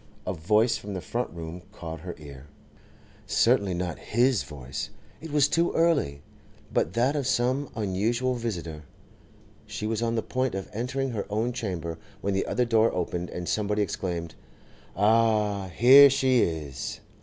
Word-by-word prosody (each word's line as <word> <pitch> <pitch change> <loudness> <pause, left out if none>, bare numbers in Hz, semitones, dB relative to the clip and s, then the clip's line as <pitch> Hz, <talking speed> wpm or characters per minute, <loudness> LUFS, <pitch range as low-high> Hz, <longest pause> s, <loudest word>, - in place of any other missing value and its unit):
A 95 - -1
voice 105 +8 +2
from 100 -1 -7
the - - -2
front 120 +7 -3
room 85 +1 -7
caught 80 -6 -7
her 90 +2 -7
ear; 70 -2 -11 0.8
certainly 95 -3 +3
not 90 -1 -3
his 120 +1 +2
voice—it 70 - -8
was 145 -1 +4
too 170 +3 +1
early—but 95 - -1
that 125 +6 +2
of 140 -3 -1
some 130 +3 +1
unusual 110 +5 0
visitor. 90 -10 -4 0.9
She 105 - -5
was 110 0 -1
on 115 0 0
the 110 - 0
point 130 -3 -1
of 95 - -5
entering 130 +4 -2
her 105 -4 -4
own 110 +4 -1
chamber, 90 -9 -4 0.2
when 100 - -1
the 95 - 0
other 125 - +1
door 115 -1 +3
opened, 90 0 -3
and 90 -1 -6
somebody 105 0 0
exclaimed, 85 -4 -4 0.6
'Ah, 105 -1 +2
here 130 +10 +8
she 130 -2 +3
is! 75 -5 -3
105 Hz, 150 wpm, -27 LUFS, 85-125 Hz, 0.9 s, here